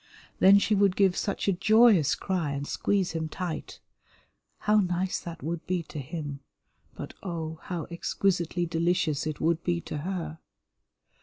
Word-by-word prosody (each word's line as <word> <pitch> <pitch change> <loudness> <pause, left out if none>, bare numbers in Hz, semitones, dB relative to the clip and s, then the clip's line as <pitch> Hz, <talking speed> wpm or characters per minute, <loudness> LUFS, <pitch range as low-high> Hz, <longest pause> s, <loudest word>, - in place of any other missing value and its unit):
Then 195 +1 +8
she 200 +2 +2
would 200 -2 +3
give 195 -3 +3
such 200 - -2
a 200 - +4
joyous 200 - +5
cry 175 -7 -2
and 140 0 -3
squeeze 195 +4 0
him 160 -1 -3
tight. 175 -1 -5 0.8
How 210 +1 +3
nice 185 -1 0
that 170 -5 -8
would 165 +2 -3
be 180 -2 0
to 155 - -8
him, 145 0 -5 0.6
but - - -7
oh, 160 -4 -5
how 170 -4 -4
exquisitely 175 0 0
delicious 165 -3 0
it 155 -3 -4
would 165 +1 +1
be 175 -1 0
to 150 - -6
her. 165 -2 -4
175 Hz, 155 wpm, -28 LUFS, 160-190 Hz, 0.8 s, Then